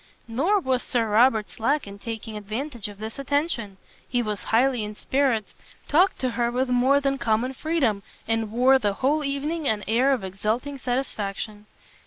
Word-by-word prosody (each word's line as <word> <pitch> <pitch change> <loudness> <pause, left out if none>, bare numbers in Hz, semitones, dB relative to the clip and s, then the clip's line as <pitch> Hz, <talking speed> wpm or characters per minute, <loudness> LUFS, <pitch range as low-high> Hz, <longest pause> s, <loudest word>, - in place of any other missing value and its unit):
Nor 310 - +2
was 260 -7 0
Sir 235 -2 0
Robert 220 0 +4
slack 280 +6 0
in 200 0 -10
taking 225 0 -6
advantage 220 +3 -5
of 205 - -11
this 220 +4 -7
attention: 275 - -1 0.3
he 245 -1 +1
was 210 -2 -4
highly 245 0 +2
in 210 0 -6
spirits, 260 -3 0 0.3
talked 360 +6 +4
to 255 -1 0
her 235 0 0
with 250 +2 0
more 255 +3 +4
than 275 -1 0
common 230 +4 +1
freedom, 265 -9 0 0.3
and 225 -1 0
wore 255 +3 +5
the 205 -4 0
whole 285 +8 +1
evening 290 +3 -2
an 210 -1 +1
air 245 +6 +3
of 260 -7 0
exulting 220 +9 -2
satisfaction. 215 -5 -3
245 Hz, 170 wpm, -25 LUFS, 215-275 Hz, 0.3 s, wore